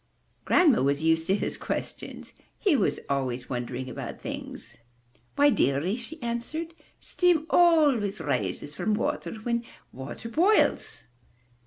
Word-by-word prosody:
'' - - -41
Grandma 320 -9 +5
was 140 +3 +1
used 160 0 +2
to 190 - +3
his - - -2
questions; - - -5 0.2
he 390 -8 +2
was - - +1
always 130 -3 -2
wondering 125 +1 -4
about 125 - -6
things. - - -7 0.6
'Why, 290 0 +5
dearie,'' 145 - +1
she 260 +7 -9
answered, 270 +8 -3 0.3
"steam 350 -4 +2
always 290 - +4
rises 145 - -2
from 195 +7 0
water 290 +2 -2
whenever 235 +1 -2 0.3
water 135 - -7
boils." 365 - +2
220 Hz, 130 wpm, -27 LUFS, -, 0.6 s, Grandma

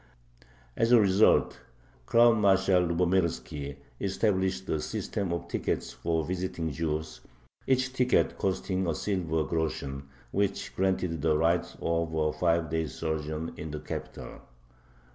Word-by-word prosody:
As 115 - +1
a 120 - +8
result, 100 0 +4 0.5
Crown 115 -2 +5
Marshal 95 -2 +4
Lubomirski 85 -6 0 0.2
established 95 -1 0
a 80 - -1
system 95 -4 -3
of 85 - -3
tickets - - -2
for 80 +6 -1
visiting 90 -2 -3
Jews, 80 0 -3 0.5
each 130 0 +1
ticket 125 -1 +2
costing 95 -1 -1
a 80 - 0
silver 85 -6 -1
groschen, 70 -4 -3 0.2
which 100 0 -1
granted 90 -4 0
the 75 0 +2
right 85 +2 +2 0.2
of 85 -1 0
a 75 -1 +1
five 85 0 +1
days' 80 -1 -2
sojourn 80 0 -3
in 80 - -6
the 75 0 -5
capital. - - -7
85 Hz, 125 wpm, -29 LUFS, 80-95 Hz, 0.5 s, a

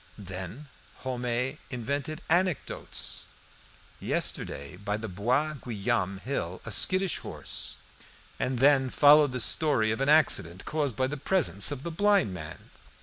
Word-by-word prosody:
Then 95 - -7 0.4
Homais 125 +2 -2
invented 140 +5 -4
anecdotes 175 -2 -1 0.7
"Yesterday, 70 +4 -2
by 105 +1 -3
the 110 +1 -5
Bois 120 +11 0
Guillaume 100 -4 -1
hill, 95 -5 -4
a 115 - -6
skittish 185 - +2
horse - - -2 0.3
" - - -26
And 130 0 -1
then 135 0 +4
followed 145 +1 +6
the 125 - -3
story 120 -3 +3
of 110 - -2
an 135 - +1
accident 95 - +3
caused 145 -6 -1
by 130 - +1
the 145 +3 -4
presence 140 - +2
of 140 -2 -4
the 170 - -4
blind 200 - +2
man. 75 -4 -9
130 Hz, 140 wpm, -28 LUFS, 105-150 Hz, 0.7 s, followed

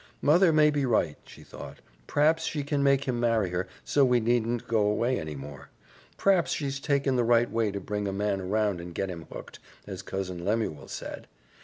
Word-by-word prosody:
"Mother 170 +4 +5
may 155 -1 +5
be 145 -1 0
right," 110 - +1
she - - -14
thought. - - -10 0.3
"P'raps 155 +3 +2
she 150 -2 -2
can 145 0 -1
make 140 0 +3
him 125 -3 -2
marry 115 -6 +1
her, 90 +2 -2 0.2
so 145 - +3
we 125 -2 +4
needn't 120 0 0
go 115 -1 +1
away 110 +5 +1
any 80 -1 -6
more. 70 -1 -9 0.5
P'raps 190 -4 +3
she's 140 -2 -2
taken 140 -2 +1
the 120 - +3
right 120 0 +3
way 115 -2 +1
to 100 0 -4
bring 105 +1 -3
a - - -1
man 100 0 -1
around 100 -1 0
and 85 -1 -9
get 95 - -2
him 85 -2 -8
hooked, - - -9 0.3
as 95 -2 -6
Cousin 95 -2 -5
Lemuel 105 -6 -1
said. - - -7
115 Hz, 200 wpm, -28 LUFS, 95-140 Hz, 0.5 s, Mother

